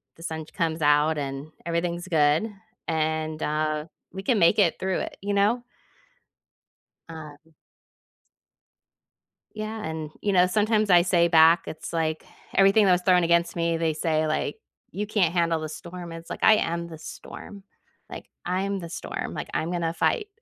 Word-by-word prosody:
the 165 - -14
sun 160 -1 -5
comes 165 0 -2
out 150 +1 +3
and 140 +2 -5
everything's 170 +1 -2
good, 160 +5 +2 0.4
and 155 -1 -1
uh, 155 0 -1 0.3
we 190 +1 -7
can 235 -2 +2
make 170 - +5
it 180 -5 +4
through 190 -1 -1
it, - - -6
you 205 +1 -2
know? 210 +5 +2 1.5
Um 160 0 -11 2.0
Yeah. 215 0 -5
And, 160 -3 -4
you 205 - 0
know, 180 -1 +5
sometimes 215 +2 +1
I 175 -2 +7
say 175 -1 +3
back, 165 0 +6
it's 155 - -7
like 160 -1 -1 0.3
everything 195 +2 +5
that 185 - +5
was 180 0 +3
thrown 180 -2 +5
against 170 0 +2
me, 170 -1 0
they 165 -1 0
say, 155 0 0
like, 155 - -2 0.3
"You 210 +1 -4
can't 190 -6 +1
handle 170 -2 +1
the 155 0 -5
storm." 175 +2 -8
It's 165 0 -9
like, - - -6
"I 220 - +7
am 170 -3 -2
the 160 - -9
storm." 195 +5 -10 0.5
Like, - - -9 0.2
"I'm 195 +2 -1
the 170 -2 -8
storm." - - -5
Like, - - -6
"I'm 165 - -1
gonna 170 -2 -1
fight." 415 - 0
170 Hz, 165 wpm, -25 LUFS, 160-190 Hz, 2.0 s, I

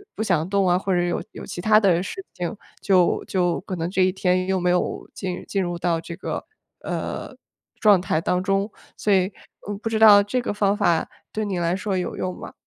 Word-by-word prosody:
不 - - -4
想 175 -6 +1
动 200 -2 +2
啊， 175 - +4
或 190 0 -1
者 175 - +2
有 175 - -1
有 - - -9
其 - - -7
它 215 +3 +5
的 180 -4 +3
事 385 - -6
情， 175 +4 -3 0.3
就 185 -3 +3
就 175 -2 0
可 185 - -5
能 165 +1 -2
这 185 0 +2
一 185 - +2
天 185 -1 +1
又 190 0 +1
没 180 0 +1
有 180 0 -1
进 185 -2 -5
进 195 - 0
入 175 -1 -3
到 170 -2 +1
这 170 +1 -8
个， 190 - -5 0.4
呃， - - -4 0.4
状 210 -4 +6
态 165 -3 0
当 180 +2 0
中， 195 +2 0 0.2
所 210 - -1
以， 190 -2 +4 0.4
嗯， 205 - -3
不 225 - -2
知 225 - 0
道 210 -2 +9
这 205 +5 -1
个 225 - -3
方 205 0 +1
法 170 -6 +2 0.2
对 215 - -2
你 195 -3 -2
来 170 0 +1
说 195 0 -2
有 180 - -3
用 185 0 -3
吗？ - - -9
185 Hz, 240 characters per minute, -23 LUFS, 175-205 Hz, 0.4 s, 道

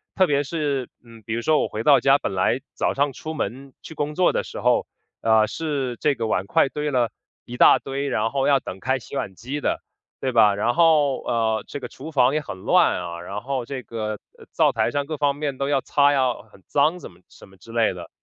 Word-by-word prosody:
特 190 - +4
别 145 -3 +1
是， 140 -4 -2
嗯， 115 -2 -16
比 110 - -4
如 120 - -1
说 155 +5 +3
我 - - 0
回 110 - -5
到 145 0 +6
家 135 +1 +4
本 110 - -3
来 105 +7 +1
早 - - 0
上 140 0 +1
出 155 +4 -7
门 135 -1 -5
去 - - -10
工 150 +1 -3
作 180 +1 +3
的 - - -1
时 - - -7
候， - - +2 0.3
呃， 110 -1 +4
是 140 -6 -3
这 145 -2 +2
个 115 - -3
碗 95 -3 0
筷 135 - +3
堆 150 +1 -3
了 125 -4 +1 0.3
一 120 0 -8
大 - - +7
堆， 140 +1 -4
然 115 -4 0
后 135 -1 0
要 140 -3 +4
等 95 - -7
开 130 +4 0
洗 130 - -10
碗 95 - -4
机 130 +9 -5
的， - - -1 0.4
对 130 - -1
吧？ 105 -4 +5
然 115 +4 +1
后， 155 -5 +4
呃， 110 -2 0
这 145 - -6
个 - - -6
厨 155 +5 -9
房 130 -2 +3
也 155 - 0
很 95 - -8
乱 - - +3
啊， 85 -1 -6
然 100 +4 -6
后 130 0 -3
这 130 0 -6
个 110 -2 -4 0.2
呃， - - -15
灶 - - +3
台 - - 0
上 145 -1 -1
各 155 0 -5
方 145 -1 +1
面 145 -2 -3
都 140 +1 -2
要 140 -2 +2
擦 145 0 +3
呀， 130 -3 +2 0.2
很 95 - -19
脏 150 +5 +2
怎 - - -10
么 85 - -21
什 - - -16
么 95 - -20
之 115 - -14
类 115 -4 +2
的 90 - -9
135 Hz, 265 characters per minute, -23 LUFS, 115-145 Hz, 0.4 s, 大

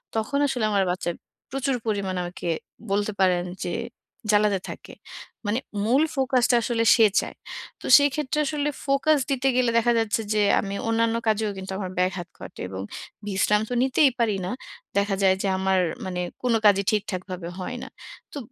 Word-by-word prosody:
তখন 225 +6 0
আসলে 245 -5 -1
আমার 200 -2 +3
বাচ্চা 180 -1 -2 0.4
প্রচুর 270 0 0
পরিমাণে 195 -4 -1
আমাকে, 175 0 -6 0.4
বলতে 205 +1 +1
পারেন 180 -2 +3 0.2
যে 175 - -2 0.6
জ্বালাতে 205 -2 +3
থাকে। - - -9 0.5
মানে 210 +4 0 0.3
মূল 260 +7 +4
ফোকাস 260 -2 +2
টা 245 - +4
আসলে 230 -1 0
সে 225 - +6
চায়। - - -5 0.5
তো - - -9
সেই 285 0 +4
ক্ষেত্রে 300 0 -1
আসলে 295 0 -1 0.2
ফোকাস 285 +2 +3
দিতে 270 0 +1
গেলে, 250 -2 +3
দেখা 235 +1 +3
যাচ্ছে 225 0 0
যে 210 - +2 0.2
আমি 200 -1 -3
অন্যান্য 225 0 +2
কাজেও 215 -1 +1
কিন্তু 190 0 -6
আমার 190 -2 -4
ব্যাঘাত 185 -1 0
ঘটে - - -10
এবং 95 0 -5 0.5
বিশ্রাম 210 +1 +2
তো 245 - -2
নিতেই 265 +1 +4
পারি 220 -4 +2
না। 185 - -3 0.5
দেখা 200 0 +2
যায় 190 -1 +5
যে - - 0
আমার 190 0 +2 0.3
মানে 180 -1 -3 0.2
কোন 245 - +2
কাজই 200 -1 +5
ঠিকঠাকভাবে 185 -4 -3
হয় 245 +7 -4
না। - - -8 0.4
তো - - -6
215 Hz, 170 wpm, -25 LUFS, 190-250 Hz, 0.6 s, সে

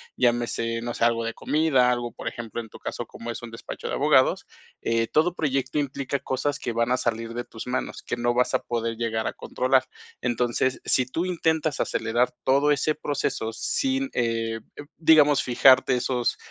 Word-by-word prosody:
llámese, 120 -1 0
no 120 0 -3
sé, - - -2
algo 115 0 +2
de 115 - -3
comida, 150 -5 +2
algo, 120 -1 -2
por - - -8
ejemplo, 120 0 -5
en 110 - -12
tu - - -12
caso, - - -5
como 120 +1 -7
es 115 - -7
un 120 - -8
despacho 115 - -7
de - - -3
abogados. - - +3 0.4
Eh, 115 0 +1
todo 160 +7 +2
proyecto 135 -3 -1
implica 140 -1 -2
cosas 135 +3 -2
que 120 - -3
van 115 +1 +1
a 125 - +3
salir 115 -1 -2
de 120 +1 -3
tus 110 - -9
manos, 125 +1 -3
que - - -3
no 120 0 +1
vas 125 0 +2
a - - +3
poder 115 -1 -3
llegar 110 -1 -1
a - - -2
controlar. 130 0 +1 0.4
Entonces, 125 +1 0
si 130 - +2
tú 165 +7 -2
intentas 160 -4 0
acelerar 120 +2 +1
todo 140 +3 +3
ese 150 +1 +2
proceso 145 -6 -2
sin, 270 - -1
eh 115 -1 -1 0.2
eh, - - -8
digamos, 150 -3 +5
fijarte 130 +1 +5
esos, 125 -1 0
125 Hz, 190 wpm, -25 LUFS, 115-140 Hz, 0.4 s, digamos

